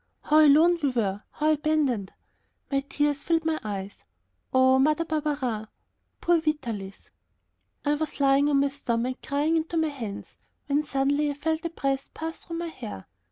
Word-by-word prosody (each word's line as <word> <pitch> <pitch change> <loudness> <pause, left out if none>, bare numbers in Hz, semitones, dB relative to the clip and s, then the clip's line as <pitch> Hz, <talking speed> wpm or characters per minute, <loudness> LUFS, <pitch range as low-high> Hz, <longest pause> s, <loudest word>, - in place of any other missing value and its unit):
How 305 +1 +4
alone 320 +4 +6
we 285 - +2
were; 210 -5 -1
how 305 +1 +2
abandoned! 295 -9 0 0.6
The 275 -1 +1
tears 290 +1 -1
filled 330 +1 0
my 320 -1 0
eyes. 200 -1 -5 0.5
Poor 260 0 +5
Mother 305 +4 +2
Barberin! 285 -8 -2 0.5
poor 345 -1 +3
Vitalis. 235 -11 -4 0.7
I 290 - +3
was 295 -1 -3
lying 275 +1 +4
on 280 -1 +3
my 280 - +2
stomach, 255 -2 -2
crying 295 +4 +1
into 325 +1 -2
my 320 -1 +2
hands, 230 -8 -7 0.3
when 290 +1 +1
suddenly 285 +2 +1
I 285 - -3
felt 315 +3 -2
a - - 0
breath 275 -4 -2
pass 325 +1 -5
through 335 - -5
my 340 0 -3
hair. 225 - -8
285 Hz, 160 wpm, -26 LUFS, 260-310 Hz, 0.7 s, alone